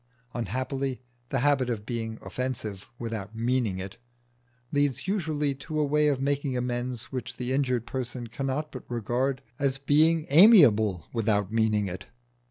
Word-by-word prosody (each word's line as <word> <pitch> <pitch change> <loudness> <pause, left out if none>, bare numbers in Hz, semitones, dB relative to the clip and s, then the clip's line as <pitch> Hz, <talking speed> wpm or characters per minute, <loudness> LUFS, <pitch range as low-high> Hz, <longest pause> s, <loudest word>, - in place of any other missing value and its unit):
Unhappily 130 +4 -2 0.3
the 135 - 0
habit 135 -3 +2
of 110 -3 -3
being 115 -1 -4
offensive 110 -6 -4
"without 110 -3 -5
meaning 115 -4 0
it" 95 +1 -7 0.7
leads 145 +1 0
usually 155 -7 0
to 155 +3 -5
a 150 - +3
way 150 +1 +3
of 140 -3 +1
making 140 -1 0
amends 125 -1 -3
which 120 -2 -5
the 125 +1 -2
injured 125 -4 0
person 125 -1 -4
cannot 135 +5 -3
but 130 - -8
regard 125 +3 -1 0.2
as 135 -1 +1
a - - -24
being 155 +3 +3
amiable 120 - +7
without 105 -3 0
meaning 110 -2 +2
it. 90 +1 -6
125 Hz, 150 wpm, -27 LUFS, 115-140 Hz, 0.7 s, amiable